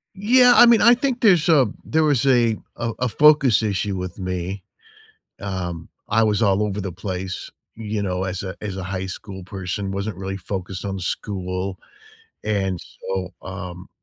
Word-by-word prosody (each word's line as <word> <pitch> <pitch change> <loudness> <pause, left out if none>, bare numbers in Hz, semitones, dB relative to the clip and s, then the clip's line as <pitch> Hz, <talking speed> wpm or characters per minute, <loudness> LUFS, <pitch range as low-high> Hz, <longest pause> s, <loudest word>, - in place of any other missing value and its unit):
Yeah, 245 +5 +6
I - - +9
mean, 235 -2 +6
I 235 +3 +8
think 245 0 -1
there's 180 -8 +5
a 145 -7 +5 0.2
there 160 +1 +2
was 145 -5 +2
a 120 -4 +3 0.2
a 120 -1 -2
a 125 - 0
focus 140 -3 +5
issue 100 -1 -1
with 90 +1 -6
me, 90 +1 -3 0.8
um, 90 -4 -4 0.2
I 115 +2 +3
was 105 -2 +2
all 100 -1 +3
over 105 -1 -2
the 95 -2 -4
place, 95 +1 -5 0.2
you 110 -1 -4
know, 90 -2 -2
as 95 0 -3
a 95 - -6
as 100 -3 -5
a 95 - -5
high 95 0 -3
school 95 0 -8
person, 95 +1 -4
wasn't 100 0 -3
really 95 +1 -4
focused 95 0 -5
on 95 -1 -3
school, 95 0 -3 0.7
and 95 -4 0
so, 95 -1 -5
um, 90 -2 -8
100 Hz, 170 wpm, -22 LUFS, 95-115 Hz, 0.8 s, I